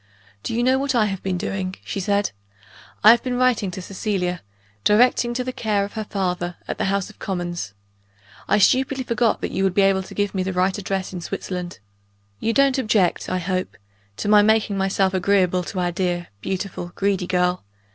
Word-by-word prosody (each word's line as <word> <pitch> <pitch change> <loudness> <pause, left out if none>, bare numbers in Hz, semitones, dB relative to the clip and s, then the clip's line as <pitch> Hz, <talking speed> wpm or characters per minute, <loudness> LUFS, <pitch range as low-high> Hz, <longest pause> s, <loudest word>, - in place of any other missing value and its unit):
"Do 225 - -3
you 240 - +1
know 260 +1 +3
what 275 -1 -1
I 225 -3 +4
have 195 -2 -3
been 185 -1 -2
doing?" 185 +1 -3
she 200 - -3
said. 200 0 +1 0.7
"I 215 - +10
have 235 0 +4
been 250 -1 -2
writing 250 -6 +2
to 180 +1 -7
Cecilia 185 -3 -2 0.4
directing 240 +2 +3
to 250 - -1
the 255 0 -4
care 210 -4 0
of 200 - -10
her 220 -1 -4
father, 180 -3 -2
at - - -4
the - - +1
House 195 +1 -1
of - - -24
Commons. 175 - -4 0.7
I - - +3
stupidly 260 +5 +3
forgot 235 -2 +1
that - - -3
you 190 - -1
would 190 -2 +1
be 200 - +5
able 195 -1 +3
to 190 - -11
give 205 -1 0
me 190 - -1
the 190 0 -2
right 185 +1 +1
address 190 -1 -3
in 180 - -5
Switzerland. 180 +1 -5 0.6
You 225 - 0
don't 275 +1 +3
object, 215 -7 +1
I 185 - 0
hope, 185 +1 -3 0.4
to - - -3
my 210 0 +7
making 215 -1 +2
myself 195 0 +1
agreeable 185 -1 +2
to 185 - -4
our 175 -1 0
dear, 175 -1 -2
beautiful, 185 - -4
greedy 195 -2 0
girl? 180 0 +1
195 Hz, 200 wpm, -22 LUFS, 180-215 Hz, 0.7 s, I